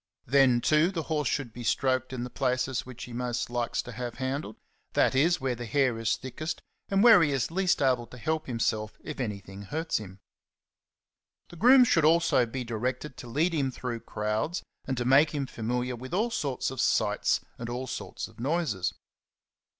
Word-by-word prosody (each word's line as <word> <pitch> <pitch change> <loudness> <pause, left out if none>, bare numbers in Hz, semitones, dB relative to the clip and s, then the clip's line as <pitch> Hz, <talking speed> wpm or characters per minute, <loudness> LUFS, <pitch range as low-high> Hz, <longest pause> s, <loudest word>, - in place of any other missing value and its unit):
Then, 130 -2 +4
too, 155 +5 +4
the 170 -4 -3
horse 150 -3 0
should 130 -6 -2
be 120 - -7
stroked 130 +1 +1
in 125 -2 -4
the 125 - -6
places 130 0 -1
which 125 -2 -8
he 125 - -8
most 120 0 -2
likes 120 -1 -1
to 125 - -8
have 120 0 -5
handled; 130 -3 -3 0.4
that - - +3
is, 160 +7 +3
where 130 -2 -1
the 120 -1 -6
hair 130 -2 +1
is 115 0 +1
thickest, 155 +5 -5 0.3
and 195 +1 +3
where 230 -6 +9
he 150 -3 +3
is 135 +1 -1
least 185 -4 +1
able 125 -3 +2
to 125 - -12
help 155 +5 -2
himself 110 -3 -1
if 150 - -6
anything 100 -5 -5
hurts 160 - -2
him. 95 -2 -10 1.3
The - - -12
groom 250 +8 +7
should 165 -9 +3
also 160 -6 +4
be 125 +2 -4
directed 125 +4 -3
to 120 - -9
lead 155 +9 +1
him 140 -4 +1
through 125 -2 -4
crowds, 110 +11 -2 0.2
and 130 -1 -2
to 120 - -1
make 140 +4 +5
him 140 -2 -1
familiar 125 +1 -2
with 130 +7 -6
all 225 +5 +1
sorts 140 - -2
of 130 - -2
sights - - +2 0.2
and 115 0 -5
all 125 +2 -3
sorts 130 0 -5
of - - -19
noises. 135 - -1
130 Hz, 190 wpm, -28 LUFS, 120-150 Hz, 1.3 s, where